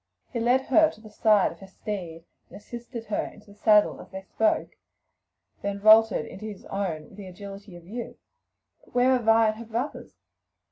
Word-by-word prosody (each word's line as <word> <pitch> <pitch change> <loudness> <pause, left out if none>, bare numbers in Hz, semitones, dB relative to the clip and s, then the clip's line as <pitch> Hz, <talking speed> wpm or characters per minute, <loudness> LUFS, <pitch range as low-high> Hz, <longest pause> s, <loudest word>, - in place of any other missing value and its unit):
He 235 - -1
led 245 +3 +3
her 310 +4 +4
to - - -14
the 215 -1 -14
side 210 -2 +3
of 170 - -14
her 195 - -11
steed 180 -5 -6 0.2
and - - -11
assisted 235 +2 -8
her 210 - -1
into 210 -1 -12
the - - -14
saddle 210 0 +3
as - - -15
he 190 0 -7
spoke, 220 +3 0 0.9
then 200 0 -3
vaulted 215 -4 +6
into 215 - -9
his 210 -3 -8
own 185 -6 -3
with 190 - -17
the 200 -2 -9
agility 195 +1 -10
of 175 -1 -13
youth. 235 +6 -7 0.7
"But - - -24
where 250 +1 +4
are 255 -1 +3
Vi 225 0 +5
and 215 - -3
her 230 - -8
brothers?" 235 +6 -5
215 Hz, 195 wpm, -26 LUFS, 195-230 Hz, 0.9 s, vaulted